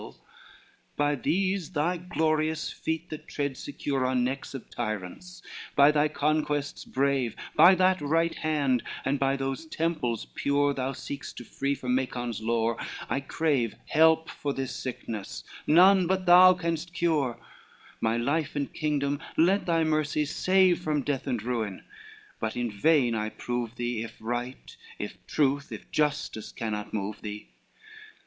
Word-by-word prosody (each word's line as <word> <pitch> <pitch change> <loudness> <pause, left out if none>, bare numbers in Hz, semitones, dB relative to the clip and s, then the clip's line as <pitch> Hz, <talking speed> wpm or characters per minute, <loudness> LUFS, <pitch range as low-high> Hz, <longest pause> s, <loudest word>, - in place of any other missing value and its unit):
LXII - - -11 0.8
"By 145 0 +2
these 185 +5 -1
thy 170 +4 +1
glorious 160 -2 0
feet, 160 0 -4
that 155 - -7
tread 140 -2 -2
secure 140 0 -3
On 130 -1 +1
necks 135 +2 -3
of 135 - -8
tyrants, 110 - -5 0.3
by 140 +1 +7
thy 150 0 +3
conquests 150 -1 -1
brave, 135 -4 0 0.2
By 190 +2 +8
that 185 -1 +3
right 165 +3 +1
hand, 145 -6 +1 0.2
and 135 +1 +1
by 135 0 +2
those 135 +3 -3
temples 155 -9 -1
pure 145 0 +1
Thou 135 0 -2
seek'st 140 +2 -7
to - - -6
free 140 +4 -2
from 125 -2 -2
Macon's 120 -3 -2
lore, 115 0 0 0.3
I - - +1
crave 140 -5 0
Help 160 +1 +4
for 140 -1 -3
this 135 -1 -3
sickness 115 -5 -5 0.2
none 185 +3 +6
but 190 0 0
thou 180 +1 +8
canst 170 -1 -3
cure, 150 -9 +1 0.6
My 115 +1 +1
life 145 +6 -1
and 140 -1 -2
kingdom 145 -2 -1 0.2
let 185 +5 +3
thy 165 -1 +3
mercy 155 -1 +1
save 185 +4 +3
From 150 -5 -1
death 140 -1 -2
and 120 -5 -1
ruin: 115 -5 -3 0.6
but 110 +1 -3
in 120 -2 -1
vain 125 +3 +3
I 110 -1 -1
prove 120 +1 -4
thee, 120 -2 -2
If 115 - -7
right, 120 +3 -5 0.2
if - - -7
truth, 140 -1 +1
if - - -9
justice 150 -7 -1
cannot 105 -2 -4
move 105 0 -4
thee. 105 -1 -7
140 Hz, 150 wpm, -28 LUFS, 120-160 Hz, 0.8 s, By